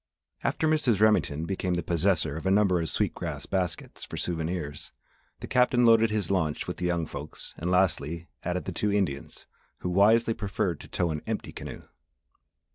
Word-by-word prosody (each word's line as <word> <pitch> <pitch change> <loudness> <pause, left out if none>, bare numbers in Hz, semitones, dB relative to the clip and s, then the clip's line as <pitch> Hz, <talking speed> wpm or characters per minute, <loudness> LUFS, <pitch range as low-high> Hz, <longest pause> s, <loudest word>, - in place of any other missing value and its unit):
After 160 - +1
Mrs. 145 -9 +2
Remington 105 -8 +3
became 95 -1 -1
the 85 - -1
possessor 85 -3 +1
of 80 - -4
a - - +4
number 95 -3 +3
of 80 - -2
sweet - - +1
grass - - -4
baskets 90 -3 -3
for - - -7
souvenirs, 80 -3 -3 0.5
the - - -5
Captain 125 -1 +3
loaded 115 -1 +6
his 105 -2 -1
launch 80 -6 0
with - - -4
the 90 - -1
young 85 -2 0
folks 75 0 -8
and, 85 - -3
lastly, 85 -3 +1 0.2
added 90 +1 -2
the 95 - -3
two 105 +4 0
Indians 95 -9 -2 0.4
who 90 - -2
wisely 110 +5 +4
preferred 95 -6 -2
to - - -11
tow 85 -2 0
an 75 -1 -3
empty - - -3
canoe. - - -8
90 Hz, 180 wpm, -28 LUFS, 80-105 Hz, 0.5 s, loaded